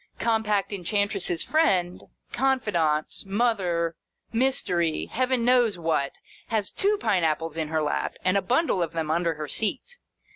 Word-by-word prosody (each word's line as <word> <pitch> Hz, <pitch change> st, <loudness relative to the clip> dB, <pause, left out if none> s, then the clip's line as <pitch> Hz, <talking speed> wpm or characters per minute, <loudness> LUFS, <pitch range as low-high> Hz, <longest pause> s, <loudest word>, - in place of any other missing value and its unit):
Compact 215 Hz, -3 st, 0 dB
Enchantress's 200 Hz, -2 st, -1 dB
friend, 185 Hz, -, +1 dB, 0.3 s
confidante, 210 Hz, -, 0 dB
mother, 195 Hz, -6 st, 0 dB, 0.4 s
mystery, 200 Hz, -10 st, 0 dB
Heaven 255 Hz, -1 st, 0 dB
knows 240 Hz, -5 st, +3 dB
what, 160 Hz, -4 st, -1 dB, 0.3 s
has 215 Hz, -3 st, -1 dB
two 415 Hz, +2 st, +1 dB
pine 200 Hz, -6 st, +1 dB
apples 160 Hz, 0 st, 0 dB
in 160 Hz, -2 st, -2 dB
her 155 Hz, 0 st, 0 dB
lap, 150 Hz, -, -1 dB
and 185 Hz, +1 st, +3 dB
a 200 Hz, -, +3 dB
bundle 250 Hz, -, +1 dB
of 165 Hz, -2 st, -2 dB
them 160 Hz, -2 st, -2 dB
under 170 Hz, -1 st, 0 dB
the 150 Hz, -, -4 dB
seat. 260 Hz, -, -1 dB
195 Hz, 140 wpm, -26 LUFS, 165-235 Hz, 0.4 s, knows